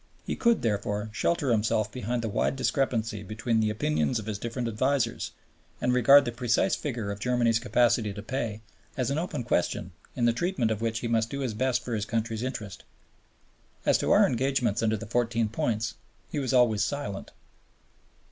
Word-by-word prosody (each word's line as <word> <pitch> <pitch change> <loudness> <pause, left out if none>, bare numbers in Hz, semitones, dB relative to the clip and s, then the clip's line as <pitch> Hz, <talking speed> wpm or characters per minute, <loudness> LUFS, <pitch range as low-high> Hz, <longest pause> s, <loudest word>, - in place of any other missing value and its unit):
He - - -2
could, 235 -2 +2
therefore, 105 -1 -1
shelter 145 +3 +1
himself 110 -1 +1
behind 120 0 -3
the - - -1
wide 105 - 0
discrepancy 115 -5 0
between 110 +3 -1
the 110 -1 +2
opinions 80 -4 0
of 110 - -5
his 105 -2 -4
different 120 +2 -3
advisers, 120 +2 0 0.5
and 125 0 +1
regard 135 +3 +7
the 120 - -2
precise 120 0 +1
figure 120 -8 -3
of 100 - -6
Germany's 120 -1 +2
capacity 115 -1 +2
to 100 +1 -7
pay 115 -3 -3 0.4
as 130 0 0
an 145 - 0
open 165 -7 -3
question 90 -4 -1 0.2
in 120 - +1
the 120 - +4
treatment 125 -4 0
of 110 0 -2
which 115 0 -1
he 120 - -2
must 115 -1 +1
do 140 +2 -4
his 125 -5 -2
best 125 +2 0
for 120 - -3
his 105 -2 -1
country's 115 -1 -2
interests. 110 -7 -5 1.0
As - - +4
to - - -1
our - - +6
engagements 125 -3 +1
under 110 -1 +1
the 115 - -7
Fourteen 115 0 0
Points 115 0 -1 0.4
he 150 - -1
was 135 -3 -1
always 120 -5 +4
silent. 110 -4 -4
115 Hz, 185 wpm, -28 LUFS, 110-125 Hz, 1.0 s, regard